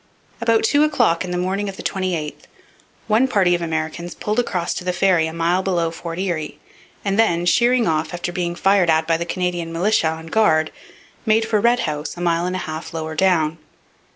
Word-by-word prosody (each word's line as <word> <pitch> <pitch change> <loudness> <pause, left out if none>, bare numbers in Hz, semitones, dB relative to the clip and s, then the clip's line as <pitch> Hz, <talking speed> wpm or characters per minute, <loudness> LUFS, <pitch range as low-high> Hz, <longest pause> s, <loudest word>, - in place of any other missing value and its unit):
About 230 -1 +2
two 285 +6 +3
o'clock 240 - +2
in 180 - -6
the 180 - -2
morning 195 +3 -1
of 195 - -8
the - - -8
28th 180 -6 -3 0.6
one 225 +4 +3
party 190 -8 +3
of 175 - 0
Americans 165 +1 -3
pulled 210 +3 -1
across 180 -8 -1
to - - -5
the 180 0 -1
ferry 175 -3 +3
a - - -5
mile 170 +3 +1
below 175 -3 0
Fort 165 0 -7
Erie, 175 -5 -3 0.5
and 200 +1 0
then, 175 -6 +2
sheering 240 +5 +3
off 155 0 0
after 175 0 -4
being 175 -1 -2
fired 195 -1 +3
at 160 0 +3
by 165 0 +2
the 170 +1 -4
Canadian 175 -2 -2
militia 175 +1 +2
on 160 0 -4
guard, 160 -5 +2 0.5
made 220 0 +2
for 215 -2 +1
Red 240 +2 +3
House 150 +2 -4
a - - -6
mile 170 0 +1
and 180 - -2
a 185 - -3
half 160 +1 -6
lower 160 -1 -4
down. 160 -2 +1
175 Hz, 205 wpm, -20 LUFS, 165-195 Hz, 0.6 s, two